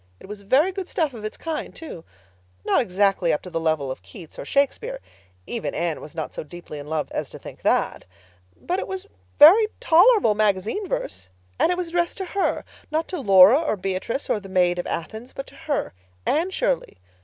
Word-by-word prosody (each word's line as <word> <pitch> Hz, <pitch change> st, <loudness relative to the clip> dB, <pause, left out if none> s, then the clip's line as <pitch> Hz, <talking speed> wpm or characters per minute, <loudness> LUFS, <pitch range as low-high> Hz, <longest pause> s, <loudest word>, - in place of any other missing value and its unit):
It -, -, -13 dB
was 205 Hz, +1 st, -8 dB
very 270 Hz, -, +3 dB
good 375 Hz, -1 st, -5 dB
stuff 310 Hz, -5 st, 0 dB
of 225 Hz, -3 st, -9 dB
its 215 Hz, -, -5 dB
kind, 325 Hz, -1 st, -5 dB
too. 300 Hz, -, -9 dB, 0.6 s
Not -, -, +3 dB
exactly 195 Hz, -4 st, +1 dB
up 150 Hz, -, -1 dB
to 180 Hz, -, -9 dB
the 165 Hz, -, -1 dB
level 155 Hz, -4 st, 0 dB
of 130 Hz, -, -7 dB
Keats 175 Hz, -8 st, -13 dB
or -, -, -6 dB
Shakespeare—even 280 Hz, -, -3 dB
Anne 165 Hz, -1 st, -2 dB
was 155 Hz, -, -11 dB
not 160 Hz, -2 st, -4 dB
so -, -, -5 dB
deeply 155 Hz, -1 st, -9 dB
in 145 Hz, -, -9 dB
love 155 Hz, -1 st, -2 dB
as -, -, -3 dB
to -, -, -10 dB
think -, -, -11 dB
that. -, -, +1 dB, 0.5 s
But 360 Hz, +2 st, -2 dB
it -, -, -4 dB
was 380 Hz, 0 st, -5 dB, 0.3 s
very 380 Hz, +9 st, +9 dB
tolerable 405 Hz, -, +5 dB
magazine 210 Hz, -, 0 dB
verse. 95 Hz, -, -4 dB, 0.3 s
And -, -, +4 dB
it 355 Hz, -, 0 dB
was 360 Hz, -2 st, -3 dB
addressed 345 Hz, 0 st, 0 dB
to 380 Hz, -, -3 dB
her—not 330 Hz, -4 st, -2 dB
to 360 Hz, -5 st, -4 dB
Laura 200 Hz, -, +7 dB
or 300 Hz, -9 st, 0 dB
Beatrice 195 Hz, +7 st, -3 dB
or -, -, 0 dB
the 195 Hz, -1 st, -12 dB
Maid 180 Hz, -2 st, +2 dB
of -, -, -3 dB
Athens, 220 Hz, +9 st, -5 dB
but 275 Hz, -, -6 dB
to 280 Hz, -, -16 dB
her, 305 Hz, -1 st, -3 dB, 0.3 s
Anne 330 Hz, +5 st, +1 dB
Shirley. -, -, -1 dB
220 Hz, 200 wpm, -23 LUFS, -, 0.6 s, very